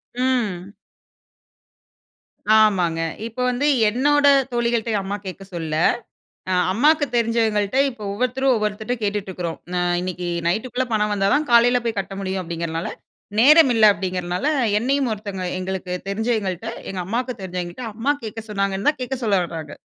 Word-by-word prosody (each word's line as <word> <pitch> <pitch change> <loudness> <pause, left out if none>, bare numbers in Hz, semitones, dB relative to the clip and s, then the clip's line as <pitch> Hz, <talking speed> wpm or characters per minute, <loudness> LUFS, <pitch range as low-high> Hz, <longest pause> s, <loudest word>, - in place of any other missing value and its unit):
ம். 215 -7 -1 1.9
ஆமாங்க. 180 -6 +2 0.3
இப்போ 230 +2 -6
வந்து, 250 +4 -1 0.2
என்னோட 285 +5 +2 0.3
தோழிகள்ட்டயே 235 -2 0
அம்மா 200 +2 -4
கேக்க 190 +1 -7
சொல்லல. 160 -2 -3 0.7
ஆ, 185 - +2 0.2
அம்மாக்கு 295 +8 +3
தெரிஞ்சவங்கள்ட்ட 225 -1 +1
இப்போ 230 -4 -12
ஒவ்வொருத்தரும் 255 +4 +1
ஒவ்வொருத்தர்ட்ட 215 +2 -2
கேட்டுட்டுருக்குறோம். 190 -5 -3 0.2
நா 180 - +1 0.2
இன்னைக்கு 180 -1 -4 0.2
நைட்டுக்குள்ள 245 +6 -1
பணம் 210 -1 +1
வந்தா 195 -1 +1
தான் 295 -1 0
காலைல 245 +1 +5
போய் 225 -3 -2
கட்ட 195 - -7
முடியும் 190 -1 -2
அப்டிங்கறனால 165 0 -4 0.5
நேரம் 295 +3 +7
இல்ல 220 -1 +4
அப்டிங்கிறனால, 185 +3 -3 0.3
என்னையும் 270 +3 +1
ஒருத்தவங்க 200 -3 -5
எங்களுக்கு 185 -1 -4 0.2
தெரிஞ்சவயங்கள்ட்ட 220 -1 -2 0.2
எங்க 190 - -4
அம்மாவுக்கு 240 +3 -2
தெரிஞ்சவயங்கள்கிட்ட 180 +5 -5
அம்மா 235 +6 -1
கேக்க 225 +1 -5
சொன்னாங்கன்னு 195 +3 0
தான், 300 - -10
கேட்க 255 +1 -3
சொல்ல 200 -3 +3
வராங்க. 160 -3 -7
210 Hz, 135 wpm, -22 LUFS, 185-245 Hz, 1.9 s, நேரம்